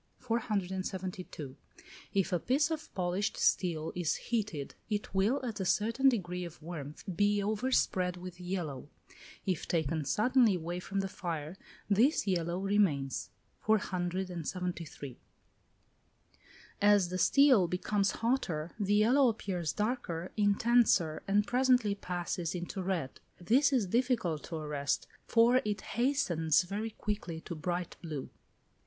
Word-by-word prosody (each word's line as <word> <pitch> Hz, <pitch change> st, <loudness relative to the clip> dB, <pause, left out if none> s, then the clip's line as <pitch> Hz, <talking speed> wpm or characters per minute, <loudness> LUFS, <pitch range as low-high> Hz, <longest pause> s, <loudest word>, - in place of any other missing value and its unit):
472. 190 Hz, -, -3 dB, 0.6 s
If 195 Hz, -2 st, 0 dB
a 175 Hz, -, +2 dB
piece 290 Hz, -, +1 dB
of 315 Hz, -1 st, -4 dB
polished 185 Hz, +3 st, -1 dB
steel 165 Hz, -4 st, +1 dB
is 175 Hz, -3 st, 0 dB
heated, 210 Hz, -, -3 dB, 0.2 s
it 210 Hz, -1 st, -3 dB
will, 205 Hz, +8 st, +2 dB
at 225 Hz, -4 st, -4 dB
a -, -, 0 dB
certain 230 Hz, +8 st, +3 dB
degree 180 Hz, -7 st, -2 dB
of 170 Hz, -2 st, -8 dB
warmth, 150 Hz, -3 st, -7 dB
be 205 Hz, +2 st, +3 dB
overspread 205 Hz, -5 st, +1 dB
with 180 Hz, 0 st, -9 dB
yellow. 170 Hz, -7 st, -4 dB, 0.6 s
If 185 Hz, -5 st, -1 dB
taken 160 Hz, -2 st, 0 dB
suddenly 230 Hz, -, +3 dB
away 175 Hz, +1 st, -4 dB
from 195 Hz, +2 st, -2 dB
the 195 Hz, -, -2 dB
fire, 165 Hz, -4 st, -5 dB, 0.3 s
this 225 Hz, +9 st, +3 dB
yellow 175 Hz, -3 st, 0 dB
remains. 190 Hz, -9 st, +1 dB, 0.3 s
473. 180 Hz, -, -2 dB, 1.6 s
As 205 Hz, -3 st, +5 dB
the 185 Hz, +1 st, -3 dB
steel 260 Hz, -3 st, +5 dB
becomes 195 Hz, +3 st, 0 dB
hotter, 180 Hz, -10 st, -1 dB
the 205 Hz, 0 st, +2 dB
yellow 250 Hz, +6 st, +5 dB
appears 185 Hz, -7 st, -2 dB
darker, 210 Hz, -7 st, -2 dB
intenser, 205 Hz, -5 st, +3 dB
and 205 Hz, +1 st, +3 dB
presently 250 Hz, -3 st, +3 dB
passes 180 Hz, -3 st, -3 dB
into 180 Hz, +3 st, -4 dB
red. 180 Hz, -8 st, -2 dB, 0.2 s
This 250 Hz, +12 st, +3 dB
is 250 Hz, -6 st, +2 dB
difficult 215 Hz, -, 0 dB
to 170 Hz, -, -6 dB
arrest, 150 Hz, -2 st, -2 dB, 0.2 s
for 240 Hz, +2 st, +5 dB
it 210 Hz, -1 st, -2 dB
hastens 190 Hz, -, +1 dB
very 205 Hz, +5 st, -3 dB
quickly 205 Hz, -6 st, -4 dB
to 170 Hz, -, -6 dB
bright 175 Hz, +2 st, -3 dB
blue. 155 Hz, -6 st, -6 dB
190 Hz, 125 wpm, -32 LUFS, 170-215 Hz, 1.6 s, As